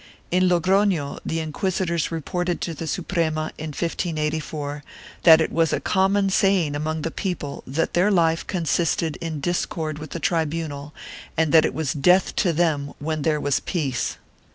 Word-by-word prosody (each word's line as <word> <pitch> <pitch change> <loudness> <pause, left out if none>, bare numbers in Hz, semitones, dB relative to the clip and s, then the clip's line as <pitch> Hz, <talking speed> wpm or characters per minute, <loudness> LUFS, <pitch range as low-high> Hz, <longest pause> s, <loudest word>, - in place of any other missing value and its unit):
2 180 - +2
In 185 0 +4
Logrono, 180 -3 +2
the 165 - -2
inquisitors 170 +1 -1
reported 175 +2 -2
to 170 - -3
the 160 +1 -6
Suprema, 160 -3 -1
in 155 - -4
1584, 150 -2 -3 0.4
that 160 -1 +8
it 160 - 0
was 165 -1 +2
a - - +1
common 195 +1 +2
saying 190 -6 +3
among 155 +1 -2
the 165 - -2
people 175 -7 -4
that 145 +6 -1
their 180 +4 +3
life 165 -4 +2
consisted 165 -3 0
in 160 -3 -4
discord 155 -1 -2
with 155 -1 -8
the 170 - -5
tribunal 160 -5 -2 0.5
and 160 -2 +2
that 160 -1 +6
it - - -2
was 160 -1 -1
death 180 +6 +3
to 180 - +3
them 155 -4 0
when 155 +1 -3
there 150 0 +1
was 145 -2 +1
peace. 140 -9 -2
160 Hz, 165 wpm, -23 LUFS, 150-175 Hz, 0.5 s, that